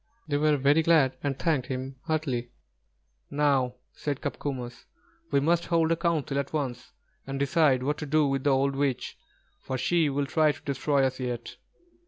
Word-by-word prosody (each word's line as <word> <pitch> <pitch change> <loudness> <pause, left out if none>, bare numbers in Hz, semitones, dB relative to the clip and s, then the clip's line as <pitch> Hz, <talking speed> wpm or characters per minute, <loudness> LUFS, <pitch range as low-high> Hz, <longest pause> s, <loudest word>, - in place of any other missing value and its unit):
They 145 -2 0
were 150 0 +3
very 140 +4 +4
glad, 155 -5 +4
and 140 -2 -2
thanked 150 -7 0
him 130 0 -5
heartily. 145 -7 -1 0.8
"Now," 140 -4 +1 0.2
said 145 -3 -3
Copcomus, 125 -4 -5 0.4
"we - - +3
must 170 +4 +2
hold 165 -1 +2
a - - +4
council 160 -4 0
at 140 +2 -4
once 135 -6 -3 0.3
and 135 0 -3
decide 140 -1 +3
what 150 +3 -1
to 150 - -5
do 155 +1 +3
with 135 0 -1
the - - +4
old 135 0 +2
witch, 135 -3 -1 0.4
for 130 - -4
she 160 +4 +2
will 140 +1 0
try 155 +1 +3
to - - -15
destroy 140 0 +1
us 130 0 0
yet." 120 -2 -4
140 Hz, 175 wpm, -27 LUFS, 130-155 Hz, 0.8 s, very